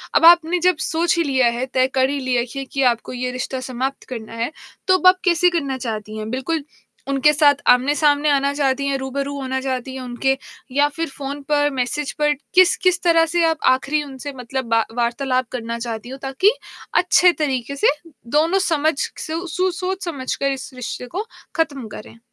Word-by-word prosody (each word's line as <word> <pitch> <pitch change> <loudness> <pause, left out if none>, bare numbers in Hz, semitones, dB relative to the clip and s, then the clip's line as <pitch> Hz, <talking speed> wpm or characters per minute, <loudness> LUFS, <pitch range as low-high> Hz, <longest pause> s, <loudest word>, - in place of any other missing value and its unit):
अब - - +5
आपने 345 +1 +6
जब 365 -3 +4
सोच 335 +2 +1
ही 335 - +3
लिया 260 -4 +2
है, 245 +2 -2
तय 260 0 +1
कर 260 0 +3
ही 285 - -2
लिया 255 -2 0
है 240 - 0
खी 275 +3 -7
ये 270 - -4
कि 275 - -1
आपको 235 - -10
ये 250 0 -3
रिश्ता 255 +1 -4
समाप्त 260 +2 -3
करना 230 -3 -7
है, 230 +4 -2 0.4
तो 375 0 +5
अब 365 - +3
आप 370 0 +6
कैसे 360 0 +4
करना 280 -7 -2
चाहती 215 -3 -5
हैं? 215 0 -5
बिल्कुल 280 +4 -2 0.4
उनके 275 +2 +4
साथ 290 -1 +5
आमने-सामने 290 +3 +3
आना 280 0 +2
चाहती 280 -1 0
हैं, 275 -1 0
रूबरू 275 +1 -3
होना 265 0 -2
चाहती 260 -1 -3
हैं 260 - -6
उनके, 255 +2 -1 0.3
या 285 +3 +3
फिर 330 0 -2
फ़ोन 280 +1 -6
पर, 290 -1 +3
मैसेज 270 +2 -2
पर 295 0 +3 0.2
किस 370 -1 +6
किस 360 -1 +3
तरह 330 -2 +4
से 345 - +3
आप 325 -1 +1 0.2
आख़िरी 290 +3 -1
उनसे 280 0 -8
मतलब 255 +1 -4
बा 230 0 +3
वार्तालाप 255 +1 0
करना 235 -1 -4
चाहती 230 0 -5
हो, 265 - -7
ताकि 270 +10 +3 0.5
अच्छे 360 0 +5
तरीके 265 -1 -2
से 280 - +2 0.5
दोनों 335 +5 +3
समझ 310 -1 +2 0.2
सु 330 +3 -4
सु 365 +2 0
सोच-समझकर 340 -7 -3
इस 265 -1 -5
रिश्ते 250 0 -5
को 420 - -2 0.3
खत्म 285 -8 -1
करें? 230 +2 -11
275 Hz, 195 wpm, -21 LUFS, 255-320 Hz, 0.5 s, आपने